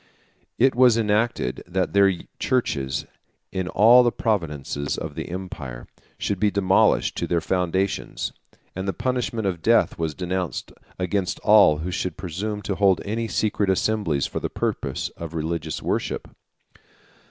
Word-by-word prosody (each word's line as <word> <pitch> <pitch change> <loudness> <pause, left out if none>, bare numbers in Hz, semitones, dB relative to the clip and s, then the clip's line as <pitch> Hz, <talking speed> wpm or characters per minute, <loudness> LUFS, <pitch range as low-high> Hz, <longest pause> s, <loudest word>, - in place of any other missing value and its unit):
It 130 +2 +4
was 125 -2 +5
enacted, 105 - 0
that 90 0 -1
their 100 -1 +5 0.3
churches, 70 - 0 0.5
in 95 -1 -2
all 115 +7 +7
the 120 -1 +3
provinces 75 - -2
of - - -5
the - - -6
empire, 75 -10 -6 0.3
should 100 -2 -2
be 105 - +3
demolished 95 -2 +3
to - - -1
their 85 - +1
foundations; 95 +3 -1 0.4
and 95 +1 -4
the 95 - 0
punishment 120 -1 -2
of 90 -4 -1
death - - +3
was 80 -2 -2
denounced 90 -1 -3 0.3
against 95 0 -1
all 100 -8 +6
who 90 - -2
should 90 -1 -3
presume 100 +4 -4
to 100 - -2
hold 95 -2 +3
any 115 +3 -2
secret 100 +2 0
assemblies 95 -7 +1
for - - -3
the - - -3
purpose - - -2
of 85 -1 -8
religious 80 -1 -3
worship. - - -2
95 Hz, 145 wpm, -24 LUFS, 85-105 Hz, 0.5 s, all